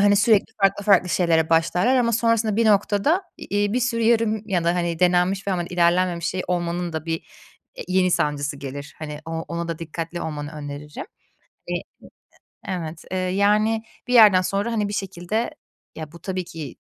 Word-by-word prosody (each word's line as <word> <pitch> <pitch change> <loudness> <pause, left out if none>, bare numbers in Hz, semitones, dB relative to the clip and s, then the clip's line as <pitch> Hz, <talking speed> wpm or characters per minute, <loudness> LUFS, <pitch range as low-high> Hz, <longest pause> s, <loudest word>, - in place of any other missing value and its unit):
hani, 205 0 +5
sürekli 210 0 +3
farklı 195 +1 +2
farklı 190 -3 +4
şeylere 165 -3 +2
başlarlar 175 +9 +3
ama 235 -2 +2
sonrasında 225 -2 +1
bir 230 -1 +3
noktada 210 - +2 0.2
i - - -8
iii, 205 0 +1
bir 250 - +1
sürü 230 -1 0
yarım 220 -2 +2
ya 175 -3 0
da, 170 +1 +2
hani, 170 -2 -1
denenmiş 180 +2 +2
ve 195 - +1
ama 175 -1 -1
ilerlenmemiş 175 0 +1
şey 185 +1 -2
olmanın 175 -1 -2
da 160 +1 -5
bir, 165 0 0 0.6
eee, - - -6
yeni 185 0 +2
sancısı 145 -2 0
gelir. 140 +2 -8
Hani, 150 -1 -6
o 165 - -6 0.2
ona 170 0 -4
da 165 - -4
dikkatli 165 +1 -5
olmanı 150 0 -5
öneririm. 150 - -7 0.6
E - - -1
e - - -4 0.9
evet, 165 -4 -5
eee, 185 - -1
yani, 210 +4 +2 0.2
bir 250 - -1
yerden 210 -6 +8
sonra, 200 +5 -1
hani, 210 -2 0
bir - - -5
şekilde 195 - -2 0.4
ya, 155 -2 -7
bu 170 - -13
tabii 185 -1 -3
ki, 160 -6 -8
180 Hz, 185 wpm, -23 LUFS, 165-205 Hz, 0.9 s, yerden